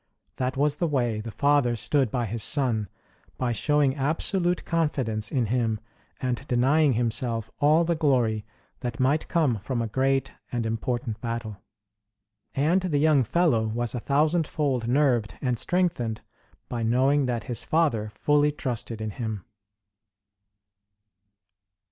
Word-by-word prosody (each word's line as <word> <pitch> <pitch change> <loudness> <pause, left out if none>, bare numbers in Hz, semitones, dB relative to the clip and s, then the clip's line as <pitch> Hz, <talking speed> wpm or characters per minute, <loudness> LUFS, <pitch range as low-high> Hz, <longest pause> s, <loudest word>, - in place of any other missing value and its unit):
That 130 0 -2
was 145 +1 +2
the 170 - 0
way 120 -7 0
the 115 - -6
father 140 0 +2
stood 130 +3 +1
by 120 +1 -1
his 115 +1 -4
son 115 -5 0 0.5
by 125 -2 0
showing 145 +2 +2
absolute 175 +5 0
confidence 130 -10 -1
in 125 -3 +1
him, 115 -1 0 0.4
and 125 -1 -2
denying 135 +4 +3
himself 115 -1 -1
all 155 +3 +4
the 170 0 +1
glory 125 -9 +1 0.4
that 120 -2 -5
might 140 +4 +2
come 145 - +1
from 120 +5 -3
a 115 - 0
great 135 +4 0 0.2
and 120 -2 -1
important 115 0 -2
battle. 115 -3 -4 1.0
And 160 +7 +2
the 175 -6 0
young 150 -2 +4
fellow 120 -5 +2
was 115 +1 -2
a 125 - -2
thousandfold 145 -3 +1
nerved 125 -5 +2
and 125 -4 -1
strengthened 165 -11 0 0.5
by 120 -2 -4
knowing 130 +5 +2
that 120 -3 -2
his 120 -3 -4
father 140 -10 +1
fully 150 0 +3
trusted 120 -5 -4
in 110 -1 -3
him. 110 -3 -5
125 Hz, 135 wpm, -26 LUFS, 115-145 Hz, 1.0 s, all